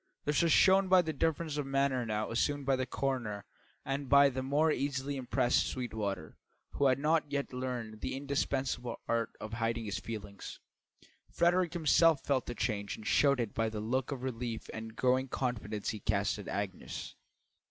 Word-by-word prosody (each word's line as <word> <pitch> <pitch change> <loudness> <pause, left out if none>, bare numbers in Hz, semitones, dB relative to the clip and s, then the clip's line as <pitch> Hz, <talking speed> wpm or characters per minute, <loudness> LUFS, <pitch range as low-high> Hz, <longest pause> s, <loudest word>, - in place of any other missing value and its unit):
This 150 -2 +2
was 170 -1 +3
shown 190 +3 +6
by 185 -1 +6
the 160 -1 -3
difference 160 +1 -1
of 145 -2 -2
manner 135 -2 +1
now 110 0 -2
assumed 145 +4 0
by 135 0 +3
the 130 -1 -2
coroner 120 -7 -2 0.4
and 135 0 -3
by 140 0 +7
the 130 0 -3
more 145 +4 +2
easily 140 0 -1
impressed 125 -1 +1
Sweetwater, 105 -9 -4 0.3
who 140 - +2
had 130 - +3
not 150 0 +1
yet 140 -2 -2
learned 125 -4 -4
the - - -3
indispensable 135 -3 -2
art 115 -1 +1
of 110 +1 -7
hiding 115 0 -1
his 105 - -3
feelings. 105 -3 -7 0.7
Frederick 175 0 +2
himself 165 -2 +4
felt 135 -3 +1
the 120 - -4
change 100 -4 -2
and 110 - -11
showed 140 -2 +4
it 115 -4 -2
by 115 0 0
the 110 -1 -5
look 125 +5 -1
of 130 -2 -4
relief 120 -3 -4
and 110 0 -7
growing 130 +2 +2
confidence 110 -6 -3
he 110 - -3
cast 105 +1 0
at 100 - -8
Agnes. 95 -2 -4
130 Hz, 175 wpm, -32 LUFS, 110-140 Hz, 0.7 s, by